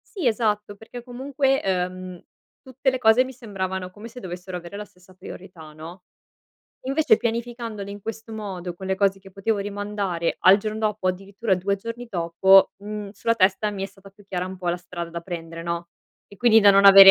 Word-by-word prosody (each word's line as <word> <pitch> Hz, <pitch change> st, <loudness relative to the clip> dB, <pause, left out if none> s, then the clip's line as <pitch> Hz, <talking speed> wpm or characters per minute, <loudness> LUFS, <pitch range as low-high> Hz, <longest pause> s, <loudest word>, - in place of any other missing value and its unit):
Sì 365 Hz, -7 st, -3 dB
esatto 210 Hz, -3 st, +1 dB
perché 225 Hz, +3 st, -10 dB
comunque, 270 Hz, +2 st, 0 dB
ehm, 185 Hz, -1 st, -2 dB, 0.4 s
tutte 265 Hz, 0 st, 0 dB
le 260 Hz, -, -1 dB
cose 225 Hz, 0 st, +5 dB
mi 260 Hz, -, -7 dB
sembravano 190 Hz, -6 st, -4 dB
come 210 Hz, +4 st, -10 dB
se 240 Hz, +2 st, -10 dB
dovessero 180 Hz, -2 st, -6 dB
avere 175 Hz, +2 st, -9 dB
la 210 Hz, -, -5 dB
stessa 180 Hz, -1 st, -21 dB
priorità, 180 Hz, -3 st, -11 dB
no. 165 Hz, +4 st, -10 dB, 0.9 s
Invece 275 Hz, -4 st, +4 dB
pianificandole 230 Hz, -3 st, -3 dB
in 205 Hz, 0 st, -8 dB
questo 225 Hz, +2 st, -7 dB
modo, 190 Hz, -5 st, -5 dB
con 190 Hz, +2 st, -8 dB
le 190 Hz, -, +1 dB
cose 195 Hz, 0 st, +2 dB
che 195 Hz, 0 st, -15 dB
potevo 200 Hz, +3 st, -1 dB
rimandare 200 Hz, -4 st, -2 dB
al 190 Hz, +2 st, +7 dB
giorno 215 Hz, +1 st, -4 dB
dopo, 210 Hz, -3 st, -1 dB
o -, -, +5 dB
addirittura 195 Hz, +3 st, -2 dB
2 195 Hz, +2 st, 0 dB
giorni 230 Hz, +4 st, -7 dB
dopo, 190 Hz, +1 st, +5 dB
mhmm, 205 Hz, 0 st, -6 dB
sulla 230 Hz, +3 st, 0 dB
testa 200 Hz, 0 st, +2 dB
mi 200 Hz, -2 st, -5 dB
è -, -, -1 dB
stata 195 Hz, 0 st, -16 dB
più 200 Hz, +1 st, -20 dB
chiara 180 Hz, -2 st, -3 dB
un 185 Hz, 0 st, -7 dB
po' 180 Hz, -1 st, -4 dB
la 175 Hz, -, -2 dB
strada 175 Hz, -1 st, -7 dB
da 170 Hz, 0 st, -5 dB
prendere 165 Hz, -1 st, -7 dB
no, 170 Hz, 0 st, -3 dB, 0.4 s
e 200 Hz, -, -16 dB
quindi 225 Hz, -2 st, +6 dB
da 205 Hz, -1 st, +8 dB
non 200 Hz, 0 st, +6 dB
avere 195 Hz, 0 st, +12 dB
200 Hz, 200 wpm, -24 LUFS, 185-220 Hz, 0.9 s, avere